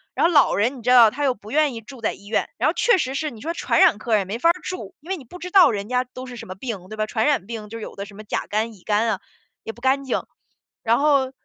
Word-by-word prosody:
然 - - +2
后 340 - +3
老 290 - +5
人， 240 +7 +1
你 - - -10
知 240 - -2
道 240 -3 +8
他 290 +6 -4
又 265 - +3
不 210 +2 -13
愿 300 -1 +2
意 230 - -7
住 245 +2 -12
在 220 - 0
医 200 - -15
院。 215 - 0
然 - - +1
后 - - 0
确 475 -4 +3
实 265 -5 -2
是， 305 +1 -2
你 230 - -12
说 330 +6 -3
传 - - 0
染 - - +6
科 225 +2 -3
儿 - - +6
也 200 - -1
没 200 +5 -4
法 335 - +4
儿 - - +6
住， 370 0 -6
因 310 +5 -16
为 385 - 0
你 290 - -11
不 355 +9 -12
知 360 +1 -6
道 360 -8 +7
人 205 -2 -4
家 250 +1 +1
都 255 +1 -10
是 250 -1 -9
什 235 - -9
么 185 - -7
病， 195 -4 -6
对 215 - -8
吧。 215 - 0
传 220 +1 -1
染 285 -10 +1
病， 215 -1 -7
就 230 - -7
是 - - -9
有 - - -8
的 200 - -6
什 205 -1 -14
么 215 - -10
甲 210 - -3
肝、 220 +2 -1
乙 190 -4 -19
肝 215 +2 +1
啊， 205 -4 -1 0.4
也 225 - -5
不 235 - -18
干 265 +2 +2
净。 265 - -2 0.6
然 230 0 +3
后， 280 -3 +3
240 Hz, 350 characters per minute, -22 LUFS, 215-280 Hz, 0.6 s, 道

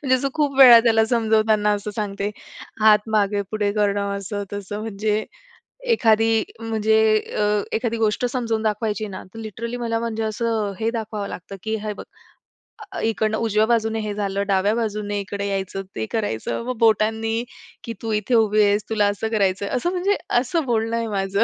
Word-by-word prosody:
म्हणजे 260 -2 +3
असं 275 +2 -1
खूप 290 -3 0
वेळा 245 -3 +10
त्याला 225 -1 +3
समजवताना 220 -2 +2
असं 205 +1 -4
सांगते, 200 -1 -2 0.5
हात 215 0 +5
मागे-पुढे 205 0 0
करणं, 200 -1 0
असं-तसं 205 0 -5
म्हणजे 215 0 -1 0.7
एखादी 225 - +3 0.2
म्हणजे 220 -1 +1 0.4
अ, - - +2 0.3
एखादी 230 0 -2
गोष्ट 220 +2 0
समजून 235 -3 -2
दाखवायची 215 0 -1
ना, 190 - -7
तर - - -9
लिटरली 225 +2 -5
मला 230 -2 -1
म्हणजे 225 -1 -3
असं 220 -1 -1
हे 225 +1 +1
दाखवावं 220 -3 -4
लागतं, 190 +2 -8
की 220 0 -1
"हे 215 - -2
बघ, - - -9 0.9
अ, - - -5
इकडनं 220 -1 0
उजव्या 220 -1 +2
बाजूने 225 -1 +1
हे 210 -1 -3
झालं, 200 -1 -1
डाव्या 200 +2 +2
बाजूने 210 -3 -2
इकडे 200 0 -4
यायचं, 195 -1 -3
ते 110 - -2
करायचं." 205 - -2
मग 255 -1 -3
बोटांनी 225 0 +2 0.4
की 230 - -4
"तू 225 - -2
इथे 210 +3 -1
उभी 215 -1 +4
आहेस, 205 +1 +3
तुला 210 -2 +2
असं 220 +3 -3
करायचंय." 200 -2 0
असं 345 +8 -1
म्हणजे 375 +3 +1 0.2
असं 300 +5 -1
बोलणं 230 -1 0
आहे 230 -1 -2
माझं. 200 0 0
220 Hz, 170 wpm, -22 LUFS, 205-225 Hz, 0.9 s, वेळा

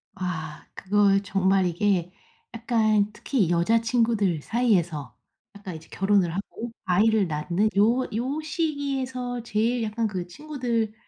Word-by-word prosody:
아 160 -4 -5
그거 200 0 +3
정말 190 0 +2
이게 180 0 0 0.4
약간 215 -3 +1
특히 215 - 0
여자친구들 225 -1 +2
사이에서 175 - 0 0.4
약간 195 -4 -8
이제 160 0 -11
결혼을 195 -3 +2
하고 225 +4 -5
아이를 205 +1 +3
낳는 170 +7 0
요 235 +5 +4
요 265 +7 -2
시기에서 270 -6 -2
제일 230 +2 0
약간 220 +1 -1
그 185 -4 -4
친구들 240 -3 -2
210 Hz, 260 characters per minute, -25 LUFS, 185-235 Hz, 0.4 s, 요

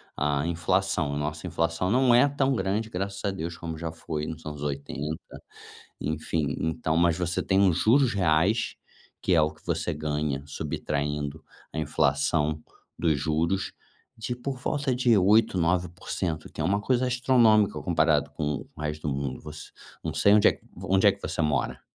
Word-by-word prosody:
a 75 +1 0
inflação, 85 -2 0
a - - -2
nossa 75 +4 -3
inflação, 85 +2 -1
não 125 +1 +4
é 125 +4 +6
tão 135 -1 +1
grande 100 +3 -1
graças 100 +2 -3
a 100 - +1
Deus 85 -2 -5
como 80 -1 -5
já 80 0 -4
foi 80 -2 -5
nos 80 -1 -7
anos 75 -1 -6
80, 70 +1 -3 0.8
enfim, 75 -1 -2
então, 80 0 -1
mas 85 0 +3
você 90 -1 -1
tem 95 +1 +2
os 85 - +1
juros 125 0 +4
reais, 95 +5 +2 0.5
que 90 - +2
é 80 - +5
o 75 - +2
que 80 - -23
você 85 0 -1
ganha, 75 -2 -2
subtraindo 75 +1 -3 0.3
a - - -6
inflação 75 0 +1 0.4
dos 80 -4 +2
juros, 85 +5 0 0.4
de 120 +2 -4
por 130 +1 -5
volta 140 0 -1
de 120 -3 +3
8%, 100 0 +4
9%, 90 -1 -2
que - - -17
é - - -1
uma 100 +3 +1
coisa 125 +5 +1
astronômica, 120 -4 +4
comparado - - +2
com 75 -2 -3
o - - -12
resto 75 0 -3
do 70 - -1
mundo 70 -2 -3
você 75 -1 -9 0.3
não - - -4
sei 100 - +4
onde 105 - +6
é - - -1 0.3
onde 95 0 +3
é - - +7
que - - -14
você - - -2
mora? 75 -2 0
85 Hz, 175 wpm, -27 LUFS, 75-100 Hz, 0.8 s, é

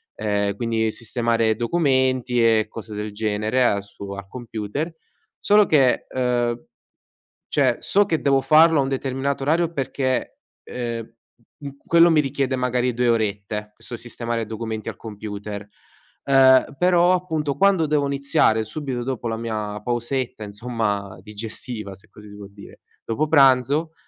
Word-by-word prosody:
ehm, 100 -1 -1
quindi 110 -1 -1
sistemare 115 -1 0
documenti 130 -2 +1
e 110 -1 +4
cose 110 -1 -9
del 105 0 -4
genere 110 +4 0
al 100 -4 +1
su 100 0 -13
al 100 0 -7
computer. 120 - -5 0.5
Solo 210 0 +5
che 135 -5 +3
ehm, 120 -2 -1 0.8
cioè 130 -5 +2
so 205 +1 +3
che 160 -5 0
devo 135 -1 +3
farlo 160 0 +5
a - - +2
un 135 - -2
determinato 135 +1 -2
orario 165 +4 +1
perché, 130 -3 -2 0.3
ehm, 115 -2 -5 0.4
uhm, 140 -2 -9
quello 170 +1 +6
mi 155 -2 +4
richiede 135 -1 -1
magari 125 0 0
2 120 +1 +1
orette, 105 -1 -1
questo 120 - -9
sistemare 115 -1 -4
documenti 110 0 -5
al 100 - -11
computer. 105 -1 -7 0.6
Ehm, 135 0 +5
però 180 0 +4
appunto 160 -6 -2
quando 190 -5 +3
devo 145 -1 +1
iniziare 140 -5 +1
subito 130 0 -5
dopo 125 -2 -3
la 115 - -2
mia 105 -2 -4
pausetta 120 0 -3
insomma 105 -3 -3
digestiva, 110 0 -7
se 95 - -21
così 105 0 -14
si 105 - -12
può 100 -1 -9
dire, 100 0 -15 0.2
dopo 145 +7 -1
pranzo, 140 +2 +4
120 Hz, 145 wpm, -22 LUFS, 110-140 Hz, 0.8 s, quello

